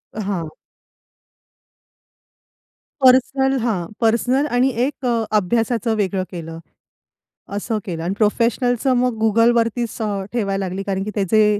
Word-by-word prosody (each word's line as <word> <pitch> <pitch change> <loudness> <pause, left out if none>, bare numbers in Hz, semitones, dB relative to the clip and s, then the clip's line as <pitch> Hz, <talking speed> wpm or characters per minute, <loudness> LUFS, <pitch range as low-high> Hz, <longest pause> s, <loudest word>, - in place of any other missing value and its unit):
हां. 195 -6 -3 2.5
पर्सनल 265 +1 +4
हां. 220 -7 -1 0.2
पर्सनल 245 +5 +2
आणि 255 +2 +3 0.2
एक 280 -1 -5
अ, 235 -2 +1
अभ्यासाचं 225 +3 0
वेगळं 195 -2 -1
केलं. 165 -2 -7 1.0
असं 215 +2 -2
केलं 165 -4 -4
आणि 175 +3 -1
प्रोफेशनलचं 245 +4 +1
मग 250 0 +1
Googleवरतीच 230 +1 +2 0.4
ठेवायला 195 -4 -1
लागली 190 +2 -4
कारण 195 -1 -2
की 210 - -4
त्याचे 210 +1 +3
225 Hz, 110 wpm, -20 LUFS, 195-245 Hz, 2.5 s, पर्सनल